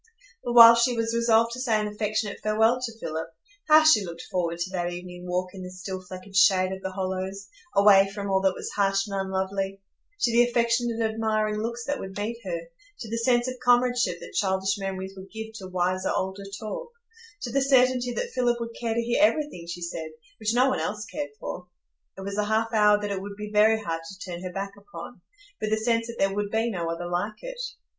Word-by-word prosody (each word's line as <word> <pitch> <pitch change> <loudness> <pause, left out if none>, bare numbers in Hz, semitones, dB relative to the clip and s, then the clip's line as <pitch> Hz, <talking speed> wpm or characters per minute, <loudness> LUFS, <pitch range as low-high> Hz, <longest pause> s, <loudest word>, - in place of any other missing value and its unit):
But 240 - -2
while 230 -1 +11
she 235 +1 +2
was 230 0 0
resolved 230 0 +3
to 250 - -6
say 230 -4 +1
an 210 - -1
affectionate 210 0 -2
farewell 220 +3 +2
to 230 -3 -5
Philip, 160 -3 -4 0.4
how 310 0 +7
she 310 -10 +6
looked 170 -2 -7
forward 170 -2 -1
to 175 +2 -3
that 175 -2 -2
evening 180 0 -8
walk 180 +1 -2
in 190 - -8
the 180 - -6
still, 185 +1 -6
fleckered 185 +1 -10
shade 185 -1 +5
of 190 0 -5
the 190 - -3
hollows, 190 +1 -4 0.3
away 195 -1 +6
from 200 0 -5
all 190 -1 +2
that 190 -1 +2
was - - -6
harsh 195 -1 +1
and 200 -2 -5
unlovely; 195 0 -2 0.4
to 235 - +3
the 235 +1 +5
affectionate, 235 -1 +1
admiring 220 -1 0
looks 235 +1 -4
that 285 - -2
would 190 0 -7
meet 225 +3 -3
her; 170 -3 -3 0.4
to 225 - -6
the 230 - -1
sense 240 +1 +2
of 255 0 -5
comradeship 245 -6 +3
that - - -10
childish 195 +1 0
memories 190 0 -4
would 190 0 -11
give 220 0 -7
to 190 - -8
wiser, 185 +1 0
older 190 +1 -2
talk; 470 - -5 0.5
to 245 - -3
the 275 - +2
certainty 255 -2 +3
that 485 - -3
Philip 240 -1 +1
would 230 0 -5
care 230 -2 -1
to 235 - +1
hear 235 +1 0
everything 300 - +1
she 175 +1 -5
said, 165 -2 -5 0.3
which 220 +1 0
no 255 +2 +5
one 260 - 0
else 210 0 -3
cared 295 +5 -5
for! 180 - -6 0.5
It - - -7
was 200 +1 -4
a 210 - +1
half 220 +2 0
hour 210 -1 +5
that 205 -1 -3
it 195 -1 -2
would 200 +1 -7
be 210 0 -7
very 220 +1 +5
hard 165 -6 -3
to 185 +4 -10
turn 175 -3 -6
her 185 -1 -5
back 195 +1 -4
upon, 185 0 -11 0.4
with 215 - -1
the 220 - +2
sense 230 +1 +1
that 235 - -7
there 195 0 +1
would 205 0 -2
be 225 +2 0
no 170 -4 -3
other 165 +1 -4
like 180 +5 -3
it. - - -6
210 Hz, 225 wpm, -26 LUFS, 190-230 Hz, 0.5 s, while